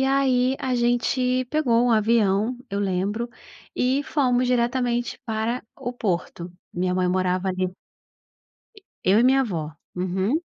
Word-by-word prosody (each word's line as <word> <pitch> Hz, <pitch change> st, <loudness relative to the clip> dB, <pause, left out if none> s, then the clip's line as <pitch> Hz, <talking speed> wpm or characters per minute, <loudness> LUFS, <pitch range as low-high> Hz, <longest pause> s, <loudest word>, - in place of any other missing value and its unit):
e -, -, +3 dB
aí 260 Hz, -2 st, +3 dB, 0.2 s
a 260 Hz, -1 st, -1 dB
gente 250 Hz, +1 st, +1 dB
pegou 245 Hz, -4 st, +2 dB
um -, -, +2 dB
avião, 220 Hz, +1 st, +2 dB
eu 200 Hz, -, -2 dB
lembro, 200 Hz, +4 st, -1 dB, 0.5 s
e 260 Hz, +3 st, +1 dB
fomos 255 Hz, -4 st, +1 dB
diretamente 245 Hz, 0 st, 0 dB
para 225 Hz, +1 st, -2 dB
o 250 Hz, -2 st, -4 dB
Porto. 180 Hz, -6 st, -3 dB, 0.2 s
Minha 180 Hz, +1 st, -1 dB
mãe 180 Hz, -1 st, +1 dB
morava 185 Hz, +1 st, 0 dB
ali 185 Hz, 0 st, 0 dB, 1.4 s
Eu 195 Hz, +4 st, +5 dB
e -, -, +4 dB
minha 265 Hz, +2 st, +5 dB
avó, 170 Hz, -11 st, -3 dB, 0.3 s
uhum. 190 Hz, -, 0 dB
235 Hz, 135 wpm, -24 LUFS, 190-250 Hz, 1.4 s, Eu